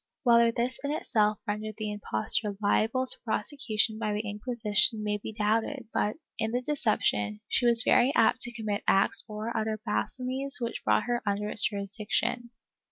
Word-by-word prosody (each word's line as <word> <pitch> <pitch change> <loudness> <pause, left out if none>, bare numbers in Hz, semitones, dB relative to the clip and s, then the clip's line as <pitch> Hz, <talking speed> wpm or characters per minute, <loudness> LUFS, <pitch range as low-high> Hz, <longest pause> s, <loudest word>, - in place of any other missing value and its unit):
Whether 235 -2 +5
this 240 +2 -2
in 285 - -2
itself 215 -8 0
rendered 215 +1 -4
the 215 -1 -4
impostor 205 - +1
liable 220 +5 +1
to - - +2
prosecution 220 -2 0
by 215 -2 -2
the 210 +1 -3
Inquisition 215 0 +1
may 210 0 -1
be 215 - -7
doubted 220 +4 -1
but, 210 - 0 0.2
in 220 0 0
the 245 - 0
deception, 210 - 0
she 245 - +1
was 235 -1 +3
very 255 +3 +4
apt 255 - +3
to 240 - +2
commit 215 -3 -3
acts 195 - +4
or 215 +2 -5
to - - -7
utter 215 0 -2
blasphemies 255 - -1
which 235 -1 -4
brought - - +2
her 240 0 -2
under 205 +1 -1
its 215 - +5
jurisdic 200 0 -6
tion.' 240 -1 -1
220 Hz, 175 wpm, -28 LUFS, 210-240 Hz, 0.2 s, Whether